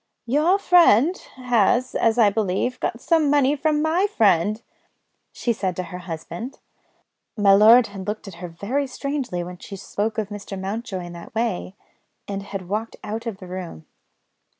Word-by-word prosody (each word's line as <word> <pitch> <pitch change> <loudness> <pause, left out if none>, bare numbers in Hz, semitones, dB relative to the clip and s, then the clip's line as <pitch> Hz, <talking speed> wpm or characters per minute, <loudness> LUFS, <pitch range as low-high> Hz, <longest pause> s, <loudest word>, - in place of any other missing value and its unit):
"Your 305 +10 +3
friend 350 - +5 0.2
has, 245 -1 +2
as 225 0 +2
I 215 -4 +5
believe, 215 +4 -1
got 230 - -2
some 320 0 +2
money 285 0 +3
from 300 +1 +1
my 340 +5 +2
friend," 210 - +2 0.7
she 235 - -1
said 190 -4 -2
to 185 - -3
her 180 - -5
husband. 175 - -7 0.8
My 200 -2 +5
lord 225 +4 +7
had 195 -2 -8
looked 210 0 -4
at 195 - -8
her 180 - -4
very 225 +12 -2
strangely 265 -9 -3
when 180 0 -9
she 200 - -9
spoke 205 +3 -3
of 215 -2 -2
Mr. 205 -2 -7
Mountjoy 195 0 -4
in 175 - -9
that 170 +4 -11
way, 220 -4 -2 0.5
and 200 -1 -4
had 195 -2 -7
walked 215 +4 -3
out 225 +3 -5
of 220 -4 -4
the 190 - -11
room. 180 - -7
215 Hz, 170 wpm, -23 LUFS, 190-255 Hz, 0.8 s, lord